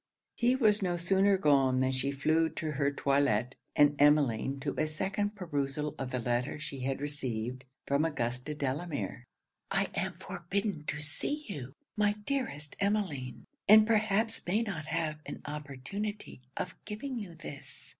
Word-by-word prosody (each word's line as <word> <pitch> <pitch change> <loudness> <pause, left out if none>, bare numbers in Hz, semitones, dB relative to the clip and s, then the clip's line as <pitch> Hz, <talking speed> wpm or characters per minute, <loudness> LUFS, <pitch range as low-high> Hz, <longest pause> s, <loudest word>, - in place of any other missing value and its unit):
He 245 +1 +3
was 215 -5 +4
no 175 -2 0
sooner 195 +3 +4
gone 135 -6 +4
than 130 0 +2
she 130 +1 0
flew 155 +4 +2
to 155 0 -3
her 140 -1 +1
toilet, 135 -4 +2 0.2
and 145 0 +6
Emmeline 140 -3 +4
to 140 0 -1
a 155 - +2
second 195 +6 -1
perusal 150 -5 -2
of 135 - -3
the 130 - -2
letter 120 +3 0
she 145 -2 -6
had 135 +1 -1
received 130 -3 -3 0.2
from 140 +2 +2
Augusta 125 -2 -2
Delamere. 145 -2 -3 0.4
'I - - +1
am - - -1
forbidden 195 -2 -3
to 150 - -2
see 290 - -1
you, 135 - -6 0.2
my 205 -1 +3
dearest 230 - -2
Emmeline; 185 - -1 0.2
and 215 +1 +9
perhaps 220 0 +2
may 210 +6 +2
not 165 -9 -4
have 155 -1 -1
an - - -5
opportunity 150 +7 -5 0.2
of 180 - -3
giving 240 +4 -4
you 185 -6 -7
this. 140 -4 -8
150 Hz, 155 wpm, -31 LUFS, 135-200 Hz, 0.4 s, and